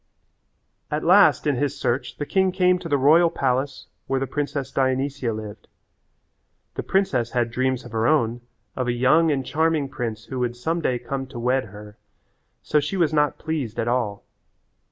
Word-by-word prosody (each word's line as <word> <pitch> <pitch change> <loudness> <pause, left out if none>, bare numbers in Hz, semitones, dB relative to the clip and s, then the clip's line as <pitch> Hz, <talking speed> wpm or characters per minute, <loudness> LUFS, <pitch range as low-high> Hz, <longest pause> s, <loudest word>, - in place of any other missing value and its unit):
At 150 +1 -2
last 190 +4 +5
in 145 -4 +1
his 145 +1 -2
search 120 0 -2
the 145 - -3
king 190 +3 +2
came 180 -1 +2
to 170 -2 -7
the 145 - +3
royal 160 +5 +5
palace 135 -1 -1 0.2
where 135 - 0
the 135 - -1
princess 140 0 -3
Dionysia 130 -1 0
lived. 110 -1 -8 1.1
The - - -4
princess 130 -12 0
had 120 -2 0
dreams 130 +1 -1
of 120 - -10
her 110 +1 0
own 120 -6 +1 0.3
of 130 -1 -2
a 120 - +1
young 150 +7 +3
and 135 -3 0
charming 160 -2 0
prince 115 -4 -5
who 130 - -5
would 120 -1 -1
some 165 +8 -2
day 125 -5 0
come 135 +2 -5
to 130 -2 -8
wed 125 +1 +1
her, 105 0 -12 0.7
so 150 - +2
she 150 +7 -3
was 165 -4 +2
not 150 -1 +2
pleased 150 -8 -4
at 115 - -1
all. 120 -5 -1
135 Hz, 180 wpm, -23 LUFS, 120-150 Hz, 1.1 s, last